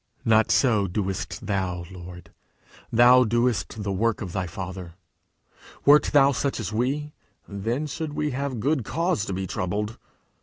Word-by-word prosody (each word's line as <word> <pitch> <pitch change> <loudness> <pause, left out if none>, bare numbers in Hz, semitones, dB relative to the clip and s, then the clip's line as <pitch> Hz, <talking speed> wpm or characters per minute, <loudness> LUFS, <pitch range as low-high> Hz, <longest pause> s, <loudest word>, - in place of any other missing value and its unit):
Not 110 -1 +4
so 110 -7 +3
doest 95 0 -3
thou, 90 -3 -2
Lord! 90 -1 -11 0.6
thou 125 +2 +7
doest 120 -2 0
the 100 - -2
work 110 +3 0
of 95 -5 -5
thy 95 0 -2
Father! 90 0 -7 0.9
Wert 145 +1 +7
thou 140 -1 +5
such 135 +1 -2
as 110 -1 -4
we, 140 +6 -1 0.3
then 115 +9 -2
should 150 0 -5
we 150 -1 -1
have 135 -2 -3
good 135 +2 0
cause 165 - -1
to 100 - -4
be 95 +1 -3
troubled! 105 +5 -3
110 Hz, 150 wpm, -25 LUFS, 95-135 Hz, 0.9 s, thou